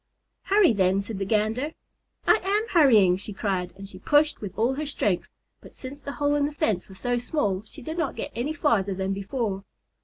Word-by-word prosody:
"Hurry, 395 - +5
then," 190 -1 +2
said 205 -1 -6
the 195 - -1
Gander. 225 +8 0 0.5
"I 440 - +5
am 415 +4 +1
hurrying," 220 - +5
she 205 +2 -6
cried, 190 -3 -2
and 195 0 -9
she 185 -1 -11
pushed 295 +7 +2
with 195 -3 -7
all 235 +4 +2
her 300 +3 -3
strength, 205 -10 -1 0.3
but - - -15
since 280 +2 -9
the 280 - -6
hole 290 0 +1
in 290 -1 +2
the 295 - -8
fence 215 - -1
was 190 - -12
so 245 +5 -1
small, 220 -7 -1
she - - -11
did 315 +6 -5
not 310 -5 -1
get - - -5
any 255 +7 -2
farther 205 - +1
than 190 +1 -1
before. 200 0 -3
225 Hz, 210 wpm, -26 LUFS, 195-290 Hz, 0.5 s, Hurry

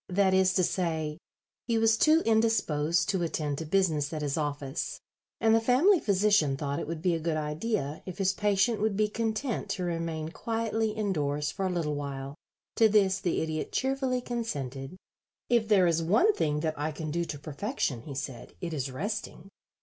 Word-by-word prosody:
That 190 +1 +3
is 190 0 +3
to 185 - +3
say, 160 -4 -1 0.5
he 230 -2 +2
was 225 0 +4
too 315 +7 +4
indisposed 190 -8 +2
to 190 -3 +1
attend 150 -4 -2
to 160 - -5
business 160 -5 +1
at 155 -2 -3
his 140 -2 -1
office, 145 -2 -3 0.4
and 225 -1 +4
the 225 - +4
family 300 - +4
physician 200 - +2
thought 140 -1 -2
it - - -4
would 165 0 -5
be 180 -2 +3
a 165 - -1
good 160 0 -1
idea 155 +1 -2
if 185 - -6
his 195 -1 +2
patient 205 +2 +1
would 215 -2 +1
be 215 0 +3
content 225 +3 -2
to 190 -4 -2
remain 165 -2 -3
quietly 225 +2 -1
indoors 150 -9 -1
for 195 - -2
a - - -1
little 165 -4 -1
while. 140 -1 -5 0.4
To 225 -1 +6
this 195 -2 +3
the 175 -3 0
Idiot 155 -1 -3
cheerfully 265 -1 0
consented. 150 - -4 0.5
"If 235 -2 +3
there 200 -4 +5
is 165 -1 +2
one 220 - +4
thing 150 - 0
that 155 -2 -2
I 150 +2 -1
can 155 0 -5
do 170 +2 0
to 150 - -5
perfection," 150 - -3
he 140 +2 -8
said, 135 -3 -6
"it 175 -3 -4
is 140 -3 -2
resting. 195 - -5
175 Hz, 190 wpm, -29 LUFS, 150-215 Hz, 0.5 s, To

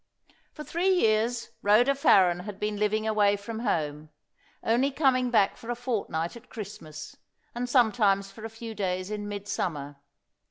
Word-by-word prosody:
For 300 - -9
three 345 +5 0
years 230 - +2
Rhoda 225 +7 +4
Farren 185 -10 +4
had 195 +2 -8
been 210 0 -2
living 215 +1 0
away 205 -2 +3
from 220 +3 -6
home, 155 -8 -2 0.5
only 240 +5 +2
coming 260 -3 +2
back 215 -5 +3
for 230 - -11
a 240 - -1
fortnight 215 -9 -2
at 235 - -13
Christmas, 160 -8 -9 0.4
and 245 +1 -3
sometimes 210 -6 +3
for 215 +2 -12
a 225 - -4
few 225 0 -8
days 185 -1 -2
in 205 -1 -4
midsummer. 175 -8 -4
215 Hz, 155 wpm, -27 LUFS, 195-240 Hz, 0.5 s, Rhoda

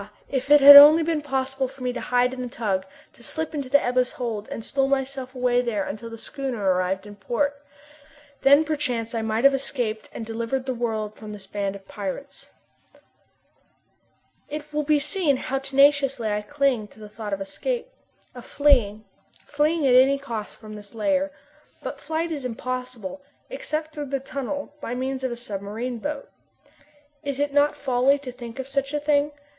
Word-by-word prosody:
if 270 0 -2
it 295 0 +8
had 285 +1 +12
only 300 +3 +11
been 320 -1 0
possible 265 -1 -2
for 265 0 -12
me 250 0 -1
to - - -5
hide 250 +1 +1
in 260 - -6
the 250 - -3
tug, 200 -6 -2 0.3
to - - -20
slip 320 +6 -4
into 280 -4 -4
the 285 +2 +5
Ebba's 250 0 0
hold, 225 -4 -4
and 225 - -6
stow 270 -1 +1
myself 270 -1 -2
away 250 -1 +2
there 225 -5 -1
until 215 +4 -6
the 230 - -8
schooner 240 -7 -2
arrived 185 +2 -1
in 205 0 -10
port! 280 +8 -2 0.8
Then 285 +3 +6
perchance 255 -7 -2
I 230 - -1
might 220 +1 -1
have 275 0 +7
escaped 245 -5 -3
and 225 - -6
delivered 230 +3 -3
the 260 - -1
world 220 -3 -2
from 215 -1 -9
this 200 -2 -10
band 200 0 -3
of 195 -1 -13
pirates. 205 +8 -6 2.0
It 300 0 -7
will 300 - +1
be 300 0 +3
seen 295 0 0
how 270 +1 -2
tenaciously 275 -3 +3
I 210 0 -1
cling 265 -2 0
to 220 - -20
the 210 - -9
thought 210 0 -7
of 195 - -2
escape 485 - -3 0.5
of 245 -1 -10
fleeing 235 -8 +2 0.4
fleeing 305 +1 +1
at 255 - +4
any 265 +2 +6
cost 230 -6 -6
from 215 -1 -11
this 205 +1 -11
lair. 285 +6 +1 0.5
But - - -5
flight 325 +1 -2
is 290 -4 -4
impossible, 250 -1 -5 0.3
except 310 -10 -4
through 295 -2 -5
the 275 0 -2
tunnel, 280 +2 -5
by 240 - -4
means 260 +1 -3
of 260 - -1
a - - -3
submarine 225 +2 -5
boat. 290 +3 -4 1.0
Is 280 -2 -3
it 290 0 0
not 290 +1 +3
folly 265 +1 +2
to 275 -3 -8
think 240 -1 -10
of 265 0 -5
such 275 +1 -2
a - - +1
thing? 295 0 +1
260 Hz, 185 wpm, -24 LUFS, 225-285 Hz, 2.0 s, had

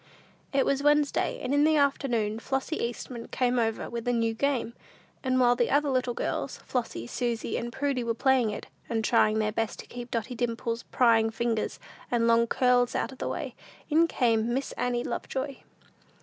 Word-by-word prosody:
It 275 -1 +2
was 275 0 +1
Wednesday; 295 0 +2
and 255 +2 -1
in 285 0 +4
the 310 +1 +4
afternoon, 245 -7 +1
Flossy 270 +6 -2
Eastman 235 0 -5
came 250 -1 +1
over 225 -1 -1
with 235 0 -5
a - - +3
new 230 -1 +1
game, 250 -1 0 0.5
and 255 -1 +2
while 245 -1 +5
the 240 - +1
little 255 -4 0
girls, - - -2
Flossy, 235 - -3
Susy 230 - -2
and 240 +1 -3
Prudy 270 0 -1
were 230 -1 -1
playing 260 -2 +3
it, 210 - -5 0.2
and 225 -1 0
trying 215 -2 +3
their 215 0 +1
best 225 0 -2
to - - -9
keep 245 0 -8
Dotty 230 +2 -2
Dimple's 230 -1 -2
prying 225 -3 +3
fingers 225 -1 -2 0.3
and 235 -1 +2
long 230 0 +4
curls 245 0 +3
out 230 - -1
of 265 - -13
the - - -2
way, - - -4 0.4
in 330 +2 +5
came 230 -6 +1
Miss 270 +1 -2
Annie 245 -1 -1
Lovejoy. 270 0 -4
240 Hz, 180 wpm, -28 LUFS, 230-265 Hz, 0.5 s, while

